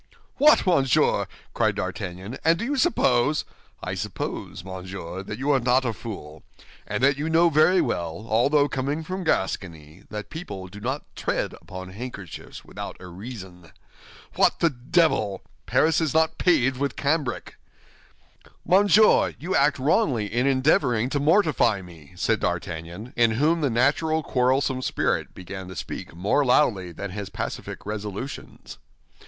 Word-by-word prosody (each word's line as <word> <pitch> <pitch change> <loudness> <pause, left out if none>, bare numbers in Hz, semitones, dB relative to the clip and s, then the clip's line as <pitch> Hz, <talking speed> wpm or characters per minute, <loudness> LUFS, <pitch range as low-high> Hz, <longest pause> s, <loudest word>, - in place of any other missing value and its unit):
"What, 300 -3 +6
monsieur!" 140 - +3 0.3
cried - - +1
D'Artagnan, 95 +7 -5
"and 165 +1 +4
do 230 - -3
you 285 +4 -1
suppose—" 150 - +2 0.4
"I - - -3
suppose, 90 - -5
monsieur, 95 -1 -7
that 105 +2 -6
you 140 +3 0
are 135 - +4
not 125 +2 +2
a 115 - 0
fool, 80 -10 -8 0.5
and - - -2
that 140 0 +4
you 155 +2 -1
knew 165 +1 +4
very 170 +5 +5
well, 85 +4 -3
although 140 +7 +3
coming 140 +4 -2
from 185 +3 -4
Gascony, 90 - -2
that 105 -1 -7
people 100 - -7
do 100 +3 -10
not 130 +7 -3
tread - - -2
upon 95 0 -9
handkerchiefs 100 -4 -8
without - - -7
a - - -11
reason. 90 -3 -10 0.6
What - - +3
the 170 - +3
devil! 125 - +1 0.2
Paris 160 +1 +3
is 160 -2 -1
not 160 0 +2
paved 135 -7 +3
with 140 +1 -2
cambric!" 140 -3 -1 1.1
"Monsieur, 205 +3 +5
you 180 +4 -3
act 145 +1 +3
wrongly 135 - +2
in 125 +3 +2
endeavoring 130 -3 +2
to 145 - 0
mortify 155 - +3
me," 85 -3 -14
said 110 +4 +1
D'Artagnan, 85 +5 -4
in 115 -2 +3
whom 160 +5 +2
the 145 - +2
natural 150 +6 +1
quarrelsome 130 0 +1
spirit - - -1
began 95 +1 -8
to 95 - -9
speak 85 - -6
more 100 +11 +2
loudly 115 -9 +2
than 100 +3 -6
his 100 0 -5
pacific - - -6
resolutions. 105 +5 -6
125 Hz, 150 wpm, -25 LUFS, 95-150 Hz, 1.1 s, What